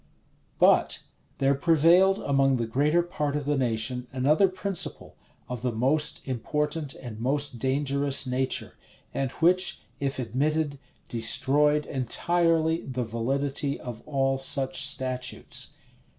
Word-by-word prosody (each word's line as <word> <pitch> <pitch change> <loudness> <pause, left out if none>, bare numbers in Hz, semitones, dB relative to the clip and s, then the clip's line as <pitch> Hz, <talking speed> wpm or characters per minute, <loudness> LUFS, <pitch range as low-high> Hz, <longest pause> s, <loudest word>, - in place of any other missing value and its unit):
But - - +3 0.3
there 135 0 +3
prevailed 170 +6 +4
among 135 -4 +2
the 120 - -1
greater 150 +9 +2
part 150 -4 -3
of 145 -1 -2
the 145 +1 +1
nation 125 0 -1
another 145 +9 +3
principle, 185 0 -3 0.3
of 125 -2 -5
the 125 0 -1
most 140 +8 0
important 150 +4 -2
and 115 -4 -9
most 135 0 -1
dangerous 140 +1 0
nature; 130 +1 -1 0.4
and 135 -1 -1
which, 185 +3 +2 0.2
if 140 -1 -2
admitted, 140 +4 -1 0.3
destroyed 145 +6 +3
entirely 165 +5 +1
the 130 -1 -4
validity 135 +5 -2
of 120 -3 -8
all 135 -2 0
such 135 0 +1
statutes. 130 -1 -3
140 Hz, 120 wpm, -27 LUFS, 130-150 Hz, 0.4 s, prevailed